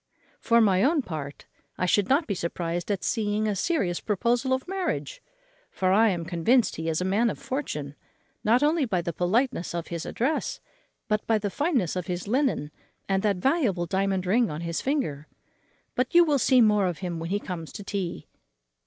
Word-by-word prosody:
For 235 0 +4
my 195 -4 +4
own 290 +4 +3
part, 150 -7 -7 0.3
I - - 0
should 195 +2 +2
not 285 +5 +3
be 205 - -2
surprized 170 0 -3
at 200 -2 -1
seeing 215 -1 0
a 210 - 0
serious 190 - 0
proposal 235 +5 0
of 260 +4 0
marriage: 385 +6 -3 0.5
for 185 -1 0
I 220 +3 +5
am 175 -4 -2
convinced 220 +10 +2
he 160 +1 -3
is 160 +2 0
a - - 0
man 210 +5 +2
of - - -4
fortune, 150 - -4 0.5
not 240 +6 +3
only 305 +1 +3
by 185 -7 -1
the 170 - -3
politeness 180 - 0
of 170 -1 -4
his 170 -2 -4
address, 270 +7 -1 0.5
but 210 0 -1
by 225 - +3
the 205 -1 -3
fineness 260 - 0
of 180 -1 -3
his 180 +1 -4
linen, 245 - 0 0.4
and 195 -1 +1
that 205 -1 +2
valuable 210 - +1
diamond 190 +1 0
ring 225 +5 +2
on 150 +2 -5
his 170 -1 -3
finger. 200 - -2 0.7
But 250 +5 -1
you 345 - +9
will 295 -4 +2
see 255 0 +5
more 210 -3 +4
of 175 -3 -3
him 170 -2 -3
when 165 +1 -5
he 200 +2 0
comes 175 -5 -6
to 205 - -7
tea." 195 -3 -4
205 Hz, 195 wpm, -26 LUFS, 175-250 Hz, 0.7 s, you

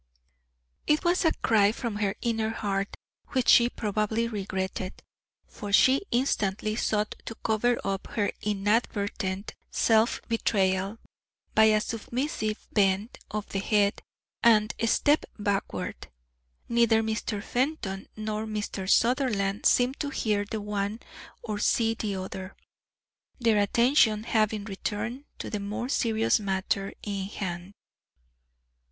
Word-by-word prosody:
It 300 - +3
was 350 +1 +2
a 320 - +5
cry 210 -2 +4
from 230 -2 -4
her 205 -2 0
inner 225 -2 0
heart, 200 -3 -2 0.4
which 255 -2 +1
she 240 0 +7
probably 215 +1 -1
regretted, 190 -3 -3 0.5
for 205 -1 -8
she 265 - +5
instantly 215 -4 0
sought 210 -1 0
to 225 - -6
cover 235 +2 +2
up 195 0 -2
her 205 -3 +1
inadvertent 205 -1 -1 0.2
self 225 0 +3
betrayal 195 -3 +1 0.6
by 220 - +6
a 215 -1 +5
submissive 230 0 -3
bend 200 +2 +1
of 210 -1 -4
the 195 - -2
head 205 0 +2 0.4
and 215 -2 +5
a 230 - +1
step 295 +6 +3
backward. 205 -2 -2 0.6
Neither 235 -1 +3
Mr. 220 -1 -2
Fenton 245 -8 -2
nor 215 0 -3
Mr. 205 -3 -4
Sutherland 220 -6 +2
seemed 250 +2 +3
to 290 - -2
hear 210 -6 0
the 215 +1 -4
one 205 +1 -2 0.4
or 210 -2 -3
see 225 +1 +2
the 215 -3 -3
other, 190 0 -6 0.8
their 225 -4 +3
attention 220 0 +3
having 215 -2 +1
returned 220 +6 -4
to - - -6
the 210 - -2
more 210 +5 -4
serious 225 -4 +2
matter 195 0 -1
in 200 -2 -3
hand. 185 -2 -5
215 Hz, 125 wpm, -27 LUFS, 200-230 Hz, 0.8 s, she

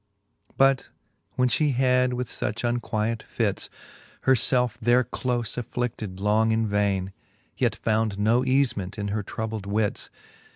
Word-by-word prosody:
But 135 -1 +3 0.5
when 125 - +3
Ihe 145 +2 +1
had 125 0 +3
with 125 0 -2
fuch 110 0 -3
unquiet 115 -2 -1
fits 105 -5 -2 0.5
Her 130 - +4
felfe 125 -1 +2
there 120 +2 +4
dole 120 - -22 0.3
aflBified 115 -4 -4
long 105 +2 +2
in 110 0 +1
vaine, 100 -2 0 0.4
Yet - - +1
found 110 -2 0
no 110 +4 +3
eaiement 120 -8 0
in 100 -1 -3
her 105 +1 -1
troubled 110 0 -5
wits. 105 0 -1
110 Hz, 135 wpm, -25 LUFS, 105-125 Hz, 0.5 s, Her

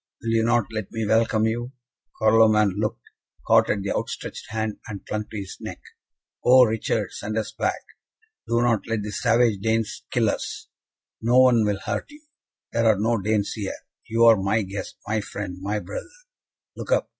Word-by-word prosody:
Will 115 - -2
you 115 0 +3
not 120 -1 +2
let 110 -3 -4
me 115 -1 -2
welcome 110 0 +2
you?" 120 +3 -2 0.5
Carloman 110 -2 +5
looked, 105 0 -2 0.4
caught - - +4
at 100 -2 0
the 100 - -2
outstretched - - -5
hand, 110 -1 -3
and 100 -3 -7
clung 105 0 -3
to 110 - -7
his 95 -2 -6
neck. - - -7 0.6
"Oh, 130 +1 +7
Richard, 110 -2 0
send 110 +1 -4
us 110 - -2
back! - - -2 0.6
Do 115 0 +2
not 115 -3 +1
let 115 -2 -1
the 105 - -5
savage 115 -2 +2
Danes 110 +1 -1
kill - - +1
us!" - - -6 0.5
"No 120 +3 +4
one 120 -4 +5
will 100 -2 0
hurt - - -3
you. 295 +1 -15 0.5
There 115 -1 +2
are 110 -2 +5
no 115 +2 +1
Danes 105 0 0
here. 105 -3 -4 0.3
You 115 +1 +2
are 115 -1 +8
my 105 +3 +1
guest, 100 +1 -6
my 110 0 0
friend, 95 -3 -6
my 100 +2 -1
brother. 100 - -7 0.7
Look - - -7
up! - - +2
110 Hz, 180 wpm, -24 LUFS, 105-115 Hz, 0.7 s, are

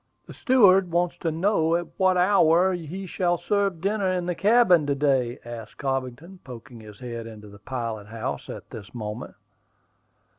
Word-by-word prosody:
"The - - -11
steward 195 -8 +4
wants 175 +1 0
to 165 - -1
know 165 -1 +1
at 175 0 -1
what 185 -1 +3
hour 180 -1 +4
he 180 +3 -6
shall 175 -1 0
serve 200 -3 -1
dinner 200 0 0
in 180 -1 -1
the 180 - -1
cabin 185 -5 +4
to 140 - +1
day?" 135 -4 +1
asked 120 -1 -9
Cobbington, 135 +6 -4
poking 120 -2 -11
his 105 -2 -13
head 115 -2 -6
into 105 -2 -11
the 100 0 -14
pilot 115 -3 -5
house 110 +1 -5
at - - -9
this 110 +2 -10
moment. 110 +1 -6
160 Hz, 170 wpm, -25 LUFS, 120-185 Hz, -, steward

